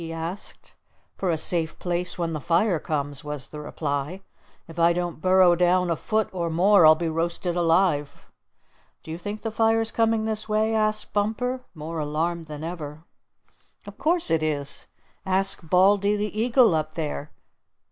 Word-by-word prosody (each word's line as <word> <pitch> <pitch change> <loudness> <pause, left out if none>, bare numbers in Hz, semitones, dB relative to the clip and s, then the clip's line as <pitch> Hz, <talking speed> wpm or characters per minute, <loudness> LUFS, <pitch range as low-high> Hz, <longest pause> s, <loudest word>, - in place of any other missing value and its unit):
he 165 -1 -6
asked. 165 +4 -7 0.4
"For 190 - -2
a 165 - +1
safe 165 0 -1
place 180 0 -2
when 170 -2 -2
the 155 - -4
fire 170 +3 +2
comes," 145 -3 -3
was 150 -3 -4
the 150 - -8
reply. 150 +4 -4 0.4
"If 165 0 -9
I 170 +1 +5
don't 175 -2 -3
burrow 185 -1 +5
down 180 0 +2
a - - +2
foot 215 +6 -1
or 170 -2 -2
more 175 +1 +5
I'll 155 - +8
be 165 +1 -3
roasted 170 +2 -2
alive." 165 -4 +1 0.8
"Do 160 - -8
you 165 - -5
think 205 +4 -6
the 225 - -2
fire's 225 0 +1
coming 225 -1 +1
this 220 0 -3
way?" 215 +1 +1
asked 215 -1 0
Bumper 250 +5 -1
more 160 +1 -5
alarmed 160 +3 -2
than 150 -1 -8
ever. 160 -2 -6 0.8
"Of - - -11
course 335 - +2
it 165 -1 +2
is! 145 -3 -3 0.4
Ask 190 -3 0
Baldy 200 +3 +4
the 210 0 -3
Eagle 230 -1 +4
up 155 0 -2
there! 150 -2 -4
175 Hz, 165 wpm, -25 LUFS, 160-205 Hz, 0.8 s, I'll